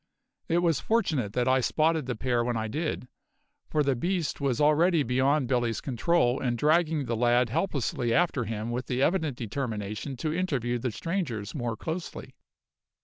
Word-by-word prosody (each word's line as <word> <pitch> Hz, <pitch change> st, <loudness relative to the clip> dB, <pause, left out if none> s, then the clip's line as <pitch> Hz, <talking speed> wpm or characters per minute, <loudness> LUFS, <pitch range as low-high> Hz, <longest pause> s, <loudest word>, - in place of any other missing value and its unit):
It 175 Hz, +1 st, +2 dB
was 165 Hz, -3 st, +2 dB
fortunate 155 Hz, -, 0 dB
that 125 Hz, 0 st, 0 dB
I 130 Hz, +1 st, +4 dB
spotted 155 Hz, +2 st, +1 dB
the 125 Hz, -, -2 dB
pair 120 Hz, +1 st, 0 dB
when 120 Hz, -1 st, -1 dB
I 110 Hz, 0 st, -2 dB
did, 150 Hz, +1 st, -3 dB, 0.6 s
for 150 Hz, -, +2 dB
the 135 Hz, -2 st, +1 dB
beast 170 Hz, +3 st, -2 dB
was 135 Hz, -4 st, 0 dB
already 155 Hz, +2 st, +4 dB
beyond 130 Hz, +3 st, +2 dB
Billy's 120 Hz, -3 st, 0 dB
control 130 Hz, -1 st, +1 dB
and 120 Hz, -2 st, 0 dB
dragging 155 Hz, +1 st, +2 dB
the 115 Hz, -1 st, -1 dB
lad 120 Hz, +1 st, +3 dB
helplessly 125 Hz, -, -1 dB
after 150 Hz, -4 st, +2 dB
him 110 Hz, +1 st, -4 dB
with 125 Hz, +1 st, -3 dB
the 130 Hz, +1 st, 0 dB
evident 160 Hz, -7 st, +1 dB
determination 110 Hz, +1 st, -4 dB
to 155 Hz, +4 st, -2 dB
interview 135 Hz, -9 st, -1 dB
the 125 Hz, -, -1 dB
strangers 120 Hz, -, -3 dB
more 120 Hz, -6 st, -3 dB
closely. 165 Hz, +6 st, -6 dB
130 Hz, 165 wpm, -28 LUFS, 120-160 Hz, 0.6 s, I